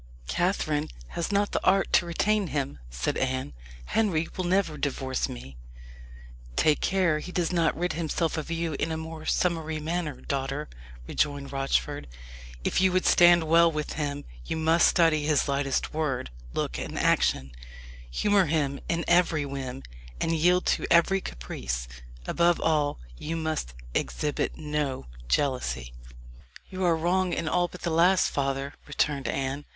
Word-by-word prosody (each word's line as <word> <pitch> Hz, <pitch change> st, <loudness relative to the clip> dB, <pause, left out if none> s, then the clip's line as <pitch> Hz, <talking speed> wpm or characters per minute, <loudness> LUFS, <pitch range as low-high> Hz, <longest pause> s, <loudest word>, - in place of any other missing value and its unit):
"Catherine 155 Hz, -, 0 dB, 0.2 s
has 170 Hz, +3 st, -3 dB
not 205 Hz, 0 st, +1 dB
the -, -, -1 dB
art 195 Hz, +1 st, +3 dB
to 175 Hz, -, +4 dB
retain 210 Hz, +4 st, +1 dB
him," 135 Hz, -, -3 dB
said -, -, -2 dB
Anne. 130 Hz, -, -1 dB, 0.3 s
"Henry 170 Hz, -, +1 dB
will 185 Hz, -, -2 dB
never 180 Hz, -3 st, +1 dB
divorce 135 Hz, -2 st, -2 dB
me." 65 Hz, +1 st, -9 dB, 1.0 s
"Take 155 Hz, -, +3 dB
care 180 Hz, -5 st, +2 dB
he 180 Hz, -, -7 dB
does 180 Hz, -1 st, 0 dB
not 170 Hz, -2 st, +2 dB
rid 175 Hz, 0 st, -1 dB
himself 165 Hz, 0 st, -1 dB
of 155 Hz, -1 st, -4 dB
you 165 Hz, -1 st, -1 dB
in 160 Hz, -, -1 dB
a 160 Hz, -, -2 dB
more 160 Hz, 0 st, -7 dB
summary 160 Hz, -3 st, 0 dB
manner, 160 Hz, -1 st, -3 dB
daughter," 140 Hz, +2 st, -3 dB, 0.4 s
rejoined 145 Hz, -2 st, -1 dB
Rochford. 135 Hz, -, -1 dB, 0.6 s
"If -, -, +1 dB
you 190 Hz, -1 st, +4 dB
would 185 Hz, -, +2 dB
stand 175 Hz, -1 st, +6 dB
well 165 Hz, +1 st, +5 dB
with 150 Hz, -1 st, -3 dB
him, 145 Hz, -1 st, -3 dB, 0.2 s
you 160 Hz, -, -3 dB
must 160 Hz, +1 st, +4 dB
study 165 Hz, -3 st, +3 dB
his 150 Hz, -2 st, +2 dB
lightest 140 Hz, -1 st, 0 dB
word, 140 Hz, -, -2 dB, 0.2 s
look, -, -, -2 dB
and -, -, -5 dB
action 65 Hz, 0 st, +2 dB, 0.6 s
humour 200 Hz, -, +3 dB
him 145 Hz, -3 st, 0 dB
in 170 Hz, 0 st, 0 dB
every 170 Hz, -4 st, +3 dB
whim 135 Hz, -2 st, -5 dB, 0.4 s
and -, -, 0 dB
yield 175 Hz, +3 st, +3 dB
to -, -, +1 dB
every 190 Hz, +3 st, +4 dB
caprice. 60 Hz, -, -5 dB, 0.4 s
Above 170 Hz, -, +2 dB
all, 150 Hz, -2 st, +1 dB, 0.2 s
you 160 Hz, +2 st, -3 dB
must 155 Hz, -, -3 dB, 0.2 s
exhibit 150 Hz, -1 st, -1 dB
no 150 Hz, -, -2 dB, 0.2 s
jealousy." 65 Hz, -, -1 dB, 0.8 s
"You 185 Hz, -1 st, -2 dB
are 170 Hz, -2 st, +3 dB
wrong 180 Hz, +2 st, +1 dB
in 160 Hz, -, -2 dB
all 175 Hz, +2 st, +2 dB
but 180 Hz, -, -12 dB
the 170 Hz, -, 0 dB
last, 175 Hz, +3 st, +4 dB
father," 135 Hz, 0 st, -1 dB
returned 145 Hz, -1 st, 0 dB
Anne. 135 Hz, +1 st, -2 dB
155 Hz, 155 wpm, -27 LUFS, 140-170 Hz, 1.0 s, stand